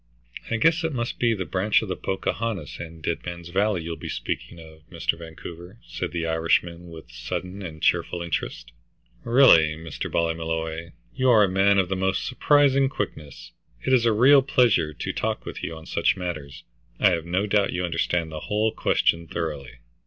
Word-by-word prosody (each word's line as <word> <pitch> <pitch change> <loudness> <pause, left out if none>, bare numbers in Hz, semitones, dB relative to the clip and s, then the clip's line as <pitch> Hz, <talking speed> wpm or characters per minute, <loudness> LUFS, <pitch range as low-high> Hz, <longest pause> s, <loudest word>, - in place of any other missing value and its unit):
"I 115 - 0
guess 165 +7 +3
it 160 -2 -1
must 120 -2 -3
be 115 -2 +2
the 95 -3 -4
branch 95 +7 +1
of - - -5
the 95 - -2
Pocahontas 95 -4 -3
and 80 -1 -9
Dead 85 - -2
Man's 85 -1 -7
Valley 100 -1 +1
you'll 85 0 -4
be - - -7
speaking 85 - -4
of, 80 -1 -14
Mr. - - -1
Vancouver," 85 +3 -10
said - - -5
the 85 -1 -2
Irishman, 85 +1 0
with 80 -7 -12
sudden 90 +11 -5
and 80 -5 -8
cheerful 85 -1 +1
interest. 85 -7 -4 0.5
"Really, 85 - +6
Mr. 80 -5 -6
Ballymolloy, 80 0 -2 0.2
you 130 -1 +2
are 110 -4 +6
a - - +4
man 95 +2 +3
of 95 -2 +3
the 95 - -2
most 95 +1 0
surprising 140 0 +3
quickness. 75 - -6 0.3
It 130 - +2
is 120 -2 +4
a - - +4
real 130 +6 +6
pleasure 120 - +3
to 75 - -5
talk - - -2
with - - -7
you 80 - -4
on 80 0 -11
such - - +1
matters. 75 -6 -6 0.4
I - - +5
have 85 -2 -1
no 95 +4 0
doubt 100 -1 +2
you 90 0 -1
understand 85 -1 -1
the 80 - -5
whole 110 +1 +1
question 85 -4 +1
thoroughly." 75 -8 -5
90 Hz, 185 wpm, -25 LUFS, 80-105 Hz, 0.5 s, Really